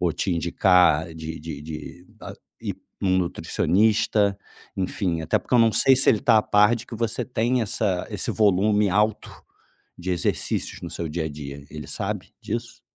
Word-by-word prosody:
ou 85 -2 +1
te 95 - -1
indicar 85 -1 +3
de 80 0 -6
de 75 -2 -7
de, 80 +3 -9
ah - - -8 0.3
ir - - -3
a - - -34 0.2
um 95 0 +3
nutricionista, 100 +3 +1 0.4
enfim, 90 -2 -1
até 80 - +1
porque - - -13
eu - - +6
não 115 -1 +5
sei 135 - +5
se 135 - +4
ele 110 - +2
está 115 -2 +5
a - - +2
par 105 +3 +4
de 115 - -7
que - - -8
você 115 0 -2
tem 125 0 0
essa 100 -3 -1
esse 105 -4 -3
volume 105 0 +3
alto 105 +3 +1 0.7
de 90 +1 -4
exercícios 85 - -2
no - - -6
seu 85 - -4
dia 80 +1 -3
a - - -3
dia. 70 -2 -8
Ele 75 0 -8
sabe 105 -1 -4
disso? 115 +2 -5
95 Hz, 185 wpm, -24 LUFS, 85-110 Hz, 0.7 s, eu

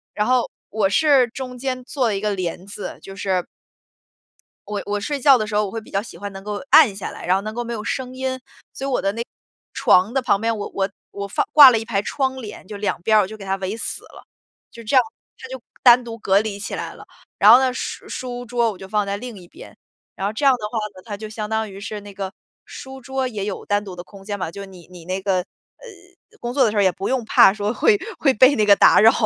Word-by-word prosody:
然 210 - 0
后， 250 -1 +2 0.2
我 210 -3 +1
是 275 +1 +4
中 255 +1 -7
间 255 0 -3
做 255 -4 -1
了 205 -3 0
一 - - -5
个 210 -1 0
帘 180 0 -4
子， 200 - -7
就 195 - -10
是 190 -3 -1 1.2
我 210 -1 -3
我 205 0 -2
睡 285 +7 -3
觉 270 0 +6
的 215 - -2
时 210 - -4
候 210 0 +2
我 190 - -6
会 225 - -4
比 215 - -16
较 195 - -1
喜 225 - -11
欢 205 0 -6
能 195 0 -9
够 210 0 -4
暗 270 -11 +7
下 200 - -5
来， - - -9
然 180 +2 +3
后 195 - 0
能 215 +1 -6
够 240 - -2
没 235 - -6
有 215 - -5
声 255 +1 -3
音， 260 0 -3 0.3
所 270 - -6
以 - - -2
我 255 - 0
的 195 - 0
那 230 +2 -3 0.5
床 210 -4 +3
的 270 - +1
旁 240 -5 +2
边， 230 0 0
我 205 - -5
我 195 0 -1 0.2
我 200 0 -5
放 195 - -1
挂 285 -4 +11
了 225 - +1
一 225 - -7
排 200 -4 -1
窗 265 +3 -1
帘， 210 -4 -10
就 210 - -8
2 200 -3 -2
边 215 +3 +3
儿 - - +6
我 190 - -2
就 220 +2 -9
给 195 - -10
它 195 - 0
围 190 +2 -4
死 - - -4
了。 - - -15 0.4
就 235 - -12
这 225 +5 -1
样， 255 - +7 0.3
它 - - -10
就 260 0 -7 0.2
单 245 0 +7
独 230 -1 -7
隔 195 +1 +3
离 210 -2 -5
起 - - -5
来 - - -5
了。 - - -13 0.3
然 210 +2 +8
后 245 - +9
呢， 260 -1 +1
书 - - -6
书 245 -1 -5
桌 235 -1 +1
我 195 - -11
就 190 +1 -10
放 210 0 +1
在 200 0 -2
另 235 0 -8
一 180 - -13
边， - - -14 0.4
然 195 - -2
后 210 - -3
这 280 +6 -2
样 270 - +7
的 215 -4 -3
话 230 - -4 0.2
呢， 185 - -12
它 210 -3 -5
就 215 +1 -8
相 215 0 -5
当 220 -2 -2
于 195 - -10
是 210 0 -6
那 205 0 -11
个， 195 0 -5 0.3
书 265 0 -10
桌 265 +1 -3
也 210 -5 -4
有 205 - -5
单 205 0 0
独 185 -2 -8
的 175 - -8
空 195 +1 -15
间 205 0 -4
嘛， 175 -3 -4
就 200 +1 -8
你 185 -3 -15
你 175 -2 -12
那 185 +2 -3
个， 190 -1 +1
呃， 180 - -10 0.5
工 240 0 -4
作 265 -2 +4
的 215 - +1
时 215 - -3
候 205 - +4
也 190 - +4
不 195 +3 -5
用 260 -3 0
怕 195 -2 +6
说 210 +2 -2
会 210 - +3 0.2
会 275 -3 +3
被 260 +5 +6
那 215 -5 +2
个 200 - +7
打 - - +6
扰。 225 +2 +7
215 Hz, 290 characters per minute, -21 LUFS, 200-245 Hz, 1.2 s, 挂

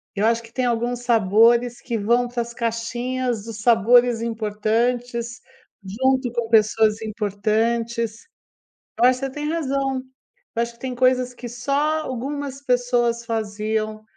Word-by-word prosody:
eu 205 +1 +1
acho 230 +1 +2
que 230 - -15
tem 255 0 0
alguns 240 0 -1
sabores 235 +2 +3
que 235 -3 -3
vão 235 +4 +2
para 240 0 -3
as 235 0 -6
caixinhas 235 0 -2
dos 220 -2 -7
sabores 240 +1 +4
importantes, 235 +2 -1 0.5
junto 260 +5 +1
com 235 -2 -2
pessoas 220 0 +3
importantes, 225 - -1 0.7
eu - - +3
acho 255 0 +1
você 270 - -2
tem 295 +2 -4
razão, 275 -4 -1 0.5
eu 235 - +2
acho 235 0 -3
que - - -26
tem 260 -1 -4
coisas 255 0 +2
que 240 0 -8
só 280 +6 0
algumas 275 +2 -5
pessoas 245 -2 +1
faziam. 215 -1 -2
235 Hz, 140 wpm, -22 LUFS, 225-250 Hz, 0.7 s, sabores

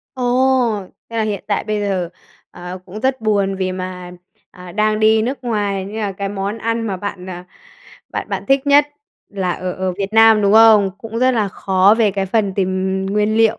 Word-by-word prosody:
Ồ, 250 -4 +1 0.3
thế 230 - -6
là 220 - +1
hiện 210 -3 -3
tại 205 - -1
bây 215 -1 -2
giờ, 190 -4 -1 0.4
ờ, 180 +1 -8
cũng 200 +3 -8
rất 260 0 0
buồn 200 -3 0
vì 185 -1 -2
mà, 185 -1 -6 0.4
à, 180 -1 -12
đang 215 0 +1
đi 220 0 +4
nước 260 +4 -2
ngoài 205 -4 -1
nên 205 +3 -8
là 205 -2 -2
cái 195 +1 -4
món 200 +2 -4
ăn 230 0 -2
mà 195 -3 -2
bạn, 190 -1 -6
ờ, 180 -1 -7 0.7
bạn - - -5
bạn - - -4
thích 270 +1 +2
nhất 290 +1 +5 0.4
là 190 -3 -2
ở 180 0 -4
ở 185 -1 -2
Việt 200 +1 -3
Nam, 225 -1 +6
đúng 200 +1 +3
không? 220 -3 +6
Cũng 225 0 -6
rất 255 +1 +3
là 215 -4 0
khó 190 +2 +3
về 215 -3 +3
cái 195 0 -2
phần 200 -1 0
tìm 190 0 -1
nguyên 210 +2 0
liệu. 225 -1 +3
205 Hz, 210 wpm, -18 LUFS, 190-225 Hz, 0.7 s, Nam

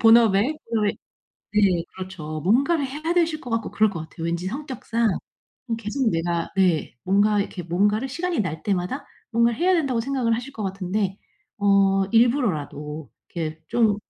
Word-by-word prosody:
본업에 225 +1 +6 0.2
우리 210 -3 +1 0.6
네. 195 -5 +3
그렇죠. 175 -5 -6
뭔가를 275 - +3
해야 305 +5 -2
되실 330 -3 +2
것 245 - -8
같고 225 -1 -1
그럴 215 0 +3
것 185 - -5
같아요. 165 - -8
왠지 170 +2 -2
성격상 235 -2 -1 0.6
뭐 230 -2 -1
계속 230 +3 -1
내가 170 -1 -1
네 180 -8 +2
뭔가 205 +2 +3
이렇게 195 -2 -4
뭔가를 205 +8 +1
'시간이 340 +5 -2
날 160 -5 -3
때마다 200 +7 -1 0.3
뭔가를 235 0 +3
해야 360 +3 +3
된다.'고 275 -9 +1
생각을 250 -2 0
하실 245 +4 -6
것 220 - -6
같은데 195 +1 -2 0.4
어 195 -1 +4
일부러라도 160 - +1 0.2
이렇게 160 -2 -3
좀 220 -4 +3
210 Hz, 330 characters per minute, -24 LUFS, 185-245 Hz, 0.6 s, 본업에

